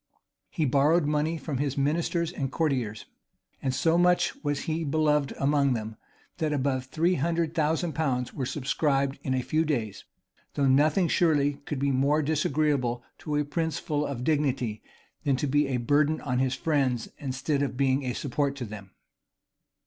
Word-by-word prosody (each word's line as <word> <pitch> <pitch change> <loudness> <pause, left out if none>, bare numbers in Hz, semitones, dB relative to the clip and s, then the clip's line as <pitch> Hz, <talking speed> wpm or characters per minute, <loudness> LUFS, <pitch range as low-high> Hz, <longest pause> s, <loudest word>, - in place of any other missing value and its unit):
[] - - -61
He 160 -5 -1
borrowed 145 +5 +3
money 150 +2 0
from 150 -4 -4
his 140 -1 -1
ministers 165 +4 0
and 135 -6 -3
courtiers; 130 -10 -1 0.6
and 135 - 0
so 160 +6 +2
much 180 0 +3
was 145 -1 -1
he 165 +1 -2
beloved 150 -1 +1
among 140 -1 +2
them, 110 -1 -5 0.4
that 155 -2 0
above 130 -2 0
three 165 +6 +1
hundred 165 0 0
thousand 160 +1 0
pounds 125 -6 -1
were 130 -3 -3
subscribed 140 0 0
in 130 -2 -1
a 130 - -1
few 155 +4 +1
days; 115 - -2 0.5
though 140 - +2
nothing 150 +7 +4
surely 145 -5 +2
could 150 -5 -2
be 140 +1 +1
more 140 +4 +2
disagreeable 145 -5 0 0.2
to 150 - -3
a 150 0 +1
prince 160 +2 -2
full 150 -1 -1
of 135 -4 -4
dignity, 135 -7 0 0.4
than 140 -2 +2
to 130 - -1
be 145 +1 +2
a 130 -2 0
burden 145 +5 +2
on 125 -3 -1
his 130 0 +1
friends 135 -7 0
instead 140 +1 -1
of 135 -3 -2
being 135 0 +2
a 125 -2 -2
support 140 +1 -1
to 130 -3 -5
them. 100 -3 -10
145 Hz, 170 wpm, -27 LUFS, 130-155 Hz, 0.6 s, nothing